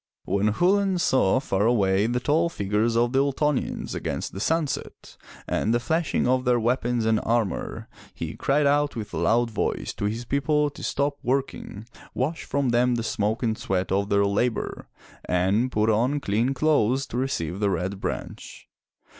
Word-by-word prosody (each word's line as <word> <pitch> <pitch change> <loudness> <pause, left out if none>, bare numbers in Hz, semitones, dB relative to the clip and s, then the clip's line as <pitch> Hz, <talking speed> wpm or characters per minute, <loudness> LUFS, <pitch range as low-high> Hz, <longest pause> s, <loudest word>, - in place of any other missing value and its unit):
When 100 +3 +1
Chulain 190 - +2
saw 130 - +3
far 105 -5 0
away 100 -3 +2
the 120 +1 0
tall 155 +6 +1
figures 105 -2 0
of 120 +1 +2
the 135 - +2
Ultonians 140 +1 -1
against - - -4
the 95 - -6
sunset, 160 +5 -2 0.3
and 115 +2 +1
the - - +2
flashing 160 +4 0
of 130 0 +2
their 125 -1 +2
weapons 120 0 0
and 110 -1 +3
armor, 115 -4 -1 0.2
he - - -6
cried 145 +2 +1
out 145 0 +2
with 110 -3 -6
a - - -3
loud 120 0 +2
voice 105 - -2
to - - -2
his 115 +4 -3
people 145 +3 +1
to - - -12
stop 140 0 -1
working, 130 -5 -3 0.3
wash 150 +6 -2
from 140 -2 0
them 120 +1 +3
the 115 - -2
smoke 110 +2 -1
and 110 -2 0
sweat 95 -1 -1
of 100 +1 0
their 100 0 +3
labor, 110 +4 -1 0.4
and 95 +8 +1
put 105 -1 +1
on 125 +7 +1
clean 120 +3 0
clothes 135 -3 +2
to 120 - -6
receive 100 -10 -2
the 105 -1 +1
Red 95 +2 -2
Branch. - - -6
120 Hz, 170 wpm, -25 LUFS, 105-140 Hz, 0.4 s, saw